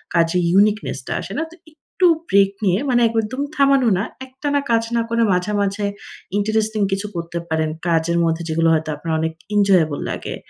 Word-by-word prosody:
কাজে 165 +1 +2
ইউনিকনেস 205 +4 +2
টা - - -2
আসে - - -7
না। - - 0
তো - - -13 0.2
একটু 310 +4 -3 0.2
ব্রেক 195 0 +4
নিয়ে 185 0 +2
মানে 240 -1 +3
একদম 225 +4 -2
থামানো 275 -3 +4
না। 195 - 0 0.2
একটানা 285 +2 -2
কাজ 230 0 +3
না 235 - +2
করে 230 0 +2
মাঝে, 180 +3 0
মাঝে 200 +1 -1 0.5
ইন্টারেস্টিং 215 +1 0
কিছু 195 +2 -2
করতে 170 0 -4
পারেন। 160 -1 0 0.2
কাজের 170 0 +1
মধ্যে 165 0 0
যেগুলো 165 +1 +2
হয়তো 155 0 0
আপনার 160 +2 -4
অনেক 160 0 -1 0.2
এনজয়েবল 185 -8 +3
লাগে - - -5
200 Hz, 175 wpm, -20 LUFS, 165-230 Hz, 0.5 s, ব্রেক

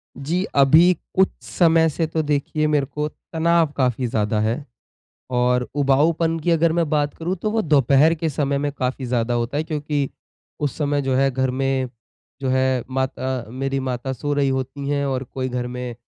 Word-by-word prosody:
जी, 160 +7 -1
अभी 155 +6 +6 0.2
कुछ 190 0 +4
समय 165 -2 +3
से 160 +2 -1
तो 160 0 -1
देखिए 150 +1 0
मेरे 150 -2 +2
को 150 +2 -3 0.3
तनाव 165 -1 +2
काफ़ी 125 -2 +1
ज़्यादा 105 -1 0
है 115 +7 -1 0.7
और 125 0 +1
उबाऊपन 155 +4 +2
की 170 +2 0
अगर 165 0 +3
मैं 170 -3 +1
बात 145 -1 +1
करूँ 175 +3 -2
तो 215 - 0
वो 225 - +1
दोपहर 145 - +4
के 160 0 -2
समय 140 -1 0
में 145 +1 -1
काफ़ी 130 -1 -3
ज़्यादा 120 -1 0
होता 120 +5 -1
क्योंकि 150 -3 -2 0.5
उस 145 -2 -2
समय 145 -1 0
जो 135 -1 -1
है, 135 +1 +3
घर 130 +1 0
में 135 -1 -1 0.5
जो 135 - -1
है 130 -1 +1
माता 130 -1 -2
मेरी 135 +2 -2
माता 130 0 -3
सो 145 +3 -2
रही 140 -1 +2
होती 135 +1 -3
हैं 140 -1 0
और 135 -1 -1
कोई 130 -1 -2
घर 125 0 -3
में 125 -1 -5
140 Hz, 185 wpm, -22 LUFS, 130-155 Hz, 0.7 s, अभी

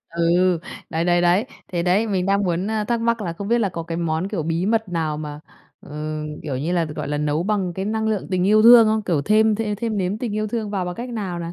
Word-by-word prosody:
Ừ, 170 +1 +2 0.3
đấy, 165 0 -1
đấy, 175 0 +3
đấy. 175 +6 +3 0.3
Thế 175 -1 0
đấy, 185 +6 +2
mình 190 -3 -1
đang 200 +1 +2
muốn, 175 +1 -1
ơ, 215 0 -1
thắc 235 +2 -1
mắc 230 0 +1
là 175 -4 -3
không 200 +4 -6
biết 235 +1 +3
là 210 -4 +1
có 170 -2 -5
cái 165 0 -5
món, 165 +2 -1
kiểu, 200 -6 -2
bí 165 +3 -1
mật 220 -1 +1
nào 160 -3 -2
mà, 150 -1 -6 0.4
ừ, 155 +1 -5 0.2
kiểu 140 -4 -3
như 155 +7 -2
là, 175 -2 +2
gọi 150 -2 -5
là, 145 0 -1
nấu 150 +2 0
bằng 195 -2 -1
cái 190 - -3
năng 220 +1 -1
lượng 215 -3 -2
tình 185 -1 +1
yêu 215 +1 +5
thương 235 -1 +9
không? 215 0 +1
Kiểu 170 -8 0
thêm 215 +4 +3
thêm 210 -1 -2
thêm 220 0 -2
nếm 190 +3 -1
tình 230 -4 -3
yêu 215 0 -1
thương 220 -2 -3
vào 195 -3 -2
bằng 180 0 -4
cách 240 +6 -6
nào 200 -7 -4
nè? 170 0 -5
185 Hz, 270 wpm, -22 LUFS, 170-215 Hz, 0.4 s, thương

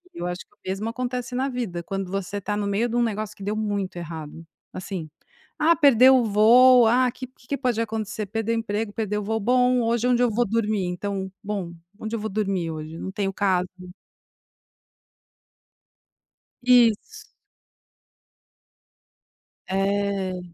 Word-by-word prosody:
E - - -8
eu 175 - -2
acho 180 +1 -4
que - - -18
o - - -60
mesmo 200 +4 -2
acontece 250 +1 -4
na 265 +2 0
vida, 225 -9 -4
quando 195 0 -4
você 195 +1 -3
tá 205 +2 -2
no 205 -1 -1
meio 210 +4 +1
de 235 - -1
negócio 215 -3 -1
que 195 - -11
deu 210 +2 -2
muito 205 -4 -2
errado, 165 -1 -7 0.3
assim: 185 -4 -6 0.5
"Ah, 330 +2 +5
perder 265 -4 +6
o 255 -2 +5
voo, 235 +4 +6
ah, 250 +2 +4
o - - -9
que 260 - -7 0.2
que 280 - -1
pode 245 -4 0
acontecer? 220 -1 -3
Perder 225 +2 -2
emprego, 215 -1 -2
perder 210 -2 -2
o - - -5
voo, 220 +2 -1
bom, 250 +2 +3
hoje 235 +1 0
é - - +2
onde 245 0 +2
eu 240 - +3
vou 240 +1 +1
dormir, 215 -3 0
então 190 +1 -4
bom, 195 -4 -4 0.3
onde 220 +1 -4
eu 230 - -3
vou 220 +1 -4
dormir 195 -4 -1
hoje, 155 +1 -7
não 190 - -5
tenho 195 -1 -2
casa.". 185 -3 +1 3.0
Isso. 250 - +3 2.4
É. 195 -1 -1
210 Hz, 160 wpm, -24 LUFS, 195-240 Hz, 3.0 s, perder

